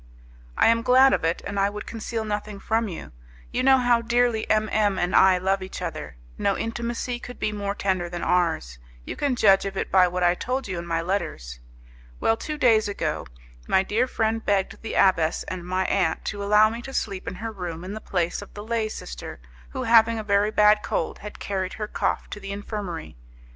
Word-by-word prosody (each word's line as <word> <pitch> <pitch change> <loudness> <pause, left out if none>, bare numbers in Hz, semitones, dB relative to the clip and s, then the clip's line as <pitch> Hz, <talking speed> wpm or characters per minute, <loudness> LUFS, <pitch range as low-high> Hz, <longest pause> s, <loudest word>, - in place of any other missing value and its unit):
"I - - +4
am 230 0 +3
glad 255 +2 +6
of - - 0
it, 165 +1 0
and 200 0 -3
I 195 +1 +3
would 210 +1 -7
conceal 225 0 -4
nothing 210 -1 -4
from 225 +2 0
you. 175 - -8 0.4
You 250 - 0
know 265 +1 +6
how 245 -2 +3
dearly 235 -1 +1
M 215 0 +2
M 205 -3 +2
and 180 0 0
I 190 -1 +6
love 190 +2 0
each 185 - -7
other. - - -5 0.2
No 200 - +1
intimacy 235 +1 -3
could 245 0 -9
be 215 - 0
more 200 -1 -3
tender 185 -4 -1
than 175 0 -5
ours; 160 - 0 0.3
you - - -5
can 280 -3 0
judge 195 -4 +5
of 195 -1 -5
it - - -3
by 185 -1 +6
what 180 0 -2
I 175 0 +5
told 255 +7 -3
you 185 -3 -3
in 170 - -7
my 165 -1 -1
letters. 165 - -3 0.6
Well, 225 - +2
two 300 +6 -5
days 225 -6 +4
ago, 205 - -3 0.4
my 190 - +3
dear 225 +6 +1
friend 225 -2 -1
begged 195 -2 0
the 225 - -5
abbess 165 -4 +3
and 185 -1 -6
my 185 +1 0
aunt 185 -5 0
to 205 -1 -3
allow 210 +1 +5
me 230 +1 -6
to 265 +2 -8
sleep 195 -3 -3
in - - -4
her 225 +4 -5
room 175 -5 -6
in 190 +2 -6
the 215 - -6
place 175 -1 -1
of 205 - -13
the 205 - -7
lay 225 -1 -1
sister, 60 - -8 0.3
who, - - -4
having 230 0 +5
a 220 - -3
very 200 0 +2
bad 210 0 +4
cold, 160 - -2
had 210 0 -9
carried 190 -2 -3
her 210 -1 -4
cough - - -1
to - - -6
the 195 0 -7
infirmary. 200 - -6
205 Hz, 215 wpm, -24 LUFS, 185-225 Hz, 0.6 s, glad